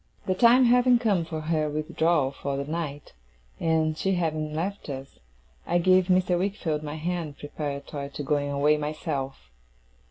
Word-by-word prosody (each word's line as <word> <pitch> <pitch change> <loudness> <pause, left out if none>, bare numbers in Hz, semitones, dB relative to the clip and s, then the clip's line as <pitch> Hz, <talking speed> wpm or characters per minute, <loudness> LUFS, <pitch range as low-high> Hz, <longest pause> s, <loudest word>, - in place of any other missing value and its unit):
The 185 - +1
time 240 +6 +6
having 245 +1 +5
come 205 -8 +1
for 160 -1 -5
her 155 -1 0
withdrawal 155 -1 +1
for 140 0 -4
the 140 - -3
night, 150 -2 -5 0.5
and 160 -1 +1
she 195 +4 0
having 155 -3 -1
left 185 +2 -3
us, 135 0 -7 0.5
I 175 - +2
gave 185 +1 +4
Mr. 180 -1 +2
Wickfield 180 -6 -1
my 150 0 -5
hand, 165 -2 -3
preparatory 145 -1 -5
to 145 - -6
going 145 0 0
away 145 +2 +3
myself. 145 - -4
155 Hz, 155 wpm, -26 LUFS, 145-180 Hz, 0.5 s, time